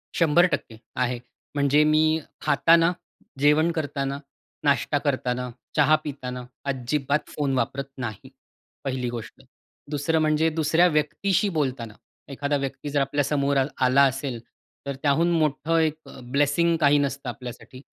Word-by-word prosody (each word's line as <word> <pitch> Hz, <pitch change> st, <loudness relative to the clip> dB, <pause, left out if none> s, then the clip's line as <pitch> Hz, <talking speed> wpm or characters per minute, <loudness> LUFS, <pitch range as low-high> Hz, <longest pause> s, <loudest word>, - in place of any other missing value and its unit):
100% 165 Hz, -7 st, +2 dB, 0.2 s
आहे. 125 Hz, -1 st, 0 dB, 0.4 s
म्हणजे 145 Hz, +1 st, +4 dB
मी 155 Hz, +1 st, +3 dB, 0.2 s
खाताना, 165 Hz, +4 st, +4 dB, 0.5 s
जेवण 150 Hz, +4 st, +4 dB
करताना, 140 Hz, -3 st, -3 dB, 0.5 s
नाश्ता 145 Hz, +1 st, +2 dB
करताना, 125 Hz, -3 st, -1 dB, 0.3 s
चहा 150 Hz, +1 st, +5 dB
पिताना 125 Hz, -3 st, -6 dB, 0.2 s
अजिबात 140 Hz, +2 st, -1 dB
फोन 140 Hz, -2 st, 0 dB
वापरत 140 Hz, +2 st, -2 dB
नाही. 115 Hz, -6 st, -6 dB, 0.5 s
पहिली 130 Hz, -2 st, -2 dB
गोष्ट. 120 Hz, -2 st, -8 dB, 0.5 s
2रं 155 Hz, +2 st, +1 dB
म्हणजे 155 Hz, +1 st, +2 dB
दुसऱ्या 160 Hz, +2 st, +3 dB
व्यक्तीशी 165 Hz, +6 st, +1 dB
बोलताना 130 Hz, -6 st, -2 dB, 0.4 s
एखादा 145 Hz, +1 st, -1 dB
व्यक्ती 140 Hz, +1 st, -5 dB
जर 145 Hz, 0 st, +1 dB
आपल्या 145 Hz, +1 st, 0 dB
समोर 140 Hz, 0 st, +1 dB
आलं 135 Hz, +1 st, +2 dB, 0.2 s
आला 130 Hz, +2 st, +5 dB
असेल, 135 Hz, -2 st, -2 dB, 0.5 s
तर 140 Hz, 0 st, -3 dB
त्याहून 160 Hz, +4 st, +3 dB
मोठं 155 Hz, 0 st, +1 dB
एक 155 Hz, -1 st, +1 dB
अ, -, -, -12 dB
ब्लेसिंग 145 Hz, +6 st, +2 dB
काही 145 Hz, 0 st, +5 dB
नसतं 140 Hz, -2 st, -2 dB
आपल्यासाठी. 125 Hz, +2 st, -9 dB
145 Hz, 130 wpm, -25 LUFS, 135-155 Hz, 0.5 s, चहा